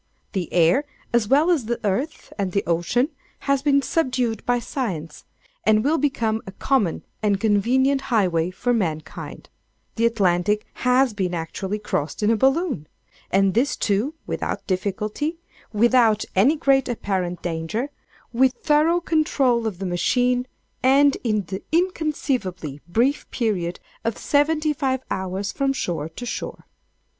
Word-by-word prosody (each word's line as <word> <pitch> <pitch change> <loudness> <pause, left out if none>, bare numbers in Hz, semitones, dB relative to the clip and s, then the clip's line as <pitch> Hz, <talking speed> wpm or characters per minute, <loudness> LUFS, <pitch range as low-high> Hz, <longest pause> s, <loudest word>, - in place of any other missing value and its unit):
The 185 -6 -3
air, 175 - +4 0.3
as 235 -3 +3
well 295 +8 +4
as 300 -10 +1
the 235 +1 -2
earth 255 +11 -2
and 190 -3 -1
the 200 - +1
ocean, 175 - +1 0.3
has 275 -1 +1
been 280 -1 +3
subdued 255 -9 0
by 245 0 +3
science, 190 - -4 0.4
and 215 0 +4
will 310 +4 +2
become 230 -6 0
a - - -5
common 215 - 0 0.2
and 205 -2 +1
convenient 250 +6 +2
highway 180 -8 +2
for 245 +7 -1
mankind. 160 -8 -4 0.5
The 230 +1 +4
Atlantic 205 -2 +1 0.2
has 250 -1 +4
been 185 -3 -1
actually 185 +5 -3
crossed 205 -3 -3
in 210 - +4
a - - +4
Balloon! 270 - +1 0.4
and 195 0 +3
this 260 +6 +2
too 220 +10 0
without - - -3
difficulty—without 220 - 0
any 235 +12 +5
great 275 -4 +2
apparent 185 -6 -2
danger—with 230 - -2
thorough 315 +4 +2
control 275 -8 +2
of 205 -5 -4
the 195 - -5
machine—and 250 +7 +1
in 215 -4 +1
the 190 +3 -5
inconceivably 280 - -1
brief 240 +11 +1
period 185 -8 -1 0.2
of 230 -2 -1
seventy 305 +1 +2
five 265 -2 -1
hours 190 +1 -2
from 275 -1 0
shore 165 - -3
to 245 - -8
shore! - - -5
230 Hz, 135 wpm, -23 LUFS, 190-270 Hz, 0.5 s, any